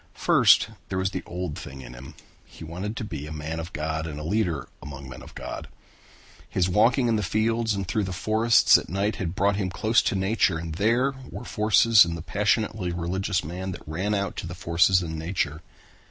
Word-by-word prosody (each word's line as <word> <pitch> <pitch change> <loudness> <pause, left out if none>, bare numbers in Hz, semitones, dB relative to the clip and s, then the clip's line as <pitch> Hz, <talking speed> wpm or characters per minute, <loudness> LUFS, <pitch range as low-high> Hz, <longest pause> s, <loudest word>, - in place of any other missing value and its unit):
First - - +5 0.2
there 95 - -2
was 95 +1 0
the - - -3
old 90 -3 -4
thing 70 -1 -9
in - - -10
him. 65 +5 -11 0.3
He - - -13
wanted 95 +7 -5
to - - -3
be 75 -8 -6
a - - -8
man 80 +1 -4
of 80 +2 -6
God 80 +1 -3
and 75 -2 -6
a - - -6
leader 85 - -1
among 70 -1 -9
men 65 -1 -10
of - - -13
God. - - -6 0.8
His 90 -1 +1
walking 115 +7 +3
in 115 -2 +2
the - - 0
fields 110 +2 0
and 100 -2 -3
through 105 +1 0
the 95 - -5
forests 110 +5 +4
at - - -10
night 100 +4 -1
had 90 -1 -3
brought 100 +1 +2
him 95 -3 -1
close 110 +5 +2
to - - -1
nature 95 -2 +1
and 80 -1 -5
there 115 - +2 0.2
were 120 - -8
forces 110 0 +5
in 85 -1 -3
the 80 - -7
passionately 105 +1 0
religious 90 +2 -1
man 90 +4 -5
that 85 - -11
ran 95 +7 -1
out 100 -2 -2
to - - -4
the 85 - -6
forces 90 +1 +3
in 80 -1 -5
nature. 80 -2 -2
90 Hz, 210 wpm, -25 LUFS, 80-105 Hz, 0.8 s, First